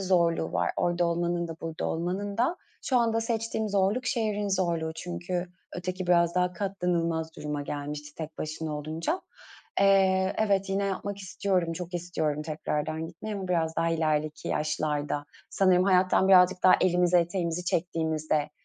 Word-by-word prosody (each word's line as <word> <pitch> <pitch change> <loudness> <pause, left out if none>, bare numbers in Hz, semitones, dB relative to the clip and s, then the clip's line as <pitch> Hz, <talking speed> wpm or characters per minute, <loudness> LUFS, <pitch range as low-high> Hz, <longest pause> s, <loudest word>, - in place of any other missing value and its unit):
zorluğu 170 -4 +2
var - - +1
orada 175 0 +1
olmanın 170 0 0
da 165 - -6
burada 165 -1 -4
olmanın 185 +5 -2
da. 260 +9 +2 0.3
Şu 260 - +1
anda 225 -1 +2
seçtiğim 225 -1 -1
zorluk 205 +5 +1
şehrin 210 -4 0
zorluğu 170 -4 0
çünkü 175 0 -3 0.3
öteki 185 +1 -4
biraz 170 -1 +3
daha 180 0 +2
katlanılmaz 170 -4 -1
duruma 150 -1 -3
gelmişti 145 +1 -5
tek 160 -1 -7
başına 155 0 -3
olunca. 160 - -2 0.6
Eee, 190 -1 +4
evet, 200 -2 +2
yine 195 +1 +1
yapmak 200 +1 -3
istiyorum, 185 -2 -1
çok 180 +1 -6
istiyorum 160 -4 -1
tekrardan 155 +1 -3
gitmeyi 180 +6 -6
ama 190 -2 -5
biraz 160 -2 0
daha 165 0 +2
ilerideki 155 -1 -1
yaşlarda. 150 -1 -1 0.3
Sanırım 185 -2 +4
hayattan 185 0 +4
birazcık 185 -1 +6
daha 185 - +8
elimizi 180 -1 +3
eteğimizi 175 0 0
çektiğimizde, 160 -3 0
175 Hz, 145 wpm, -28 LUFS, 160-190 Hz, 0.6 s, daha